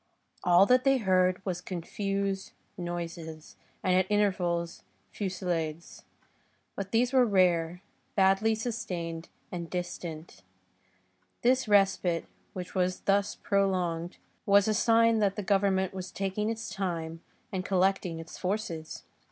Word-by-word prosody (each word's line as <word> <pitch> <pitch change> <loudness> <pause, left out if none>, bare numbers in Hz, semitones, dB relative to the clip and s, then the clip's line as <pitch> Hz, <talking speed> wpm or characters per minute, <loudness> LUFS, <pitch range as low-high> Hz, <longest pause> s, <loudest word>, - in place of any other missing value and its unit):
All 180 +1 +6
that 250 +4 +4
they 270 -1 +4
heard 185 -3 +2
was 180 -2 -2
confused 195 +2 -3 0.2
noises, 170 -3 -6 0.3
and 185 - +2
at 185 +1 +2
intervals, 180 -5 0 0.3
fusillades; 175 -5 -3 0.7
but 195 -1 -5
these 245 +3 +2
were 260 -1 +6
rare, 180 -4 +2 0.3
badly 195 +3 +4
sustained 180 -8 -4 0.2
and 170 -2 -5
distant. 175 - -6 1.0
This 255 0 +3
respite, 195 -4 +3 0.3
which 180 -1 -6
was 185 -1 0
thus 200 0 +1
prolonged, 180 -4 0 0.3
was 200 0 +5
a 215 - +2
sign 230 +1 +4
that 200 -2 +2
the 210 - -3
Government 195 -1 +2
was 185 -1 -6
taking 195 +2 -2
its 225 -1 -4
time, 165 -4 -3 0.3
and 190 -2 -2
collecting 185 -2 +1
its 165 0 -9
forces. 180 -5 -3
190 Hz, 120 wpm, -29 LUFS, 175-205 Hz, 1.0 s, All